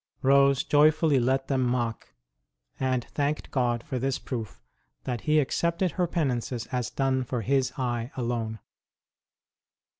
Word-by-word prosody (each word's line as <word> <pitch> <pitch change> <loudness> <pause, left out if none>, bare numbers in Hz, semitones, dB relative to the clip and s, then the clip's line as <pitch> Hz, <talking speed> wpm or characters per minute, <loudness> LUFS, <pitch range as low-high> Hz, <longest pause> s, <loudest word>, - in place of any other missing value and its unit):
Rose 140 0 +5
joyfully 150 -1 +4
let 130 +2 +1
them 135 -2 +1
mock, 120 - -2 0.6
and 130 -2 0
thanked 145 +1 -2
God 120 -3 0
for 130 -4 -3
this 135 +1 0
proof 115 -5 -6 0.4
that 125 -3 -3
He 155 0 +2
accepted 170 +5 0
her 180 +1 0
penances 125 -7 -1
as 125 -3 -1
done 135 -1 0
for 125 -1 -3
His 135 +3 +1
eye 120 -2 -2
alone. 115 -3 -2
130 Hz, 130 wpm, -27 LUFS, 120-140 Hz, 0.6 s, Rose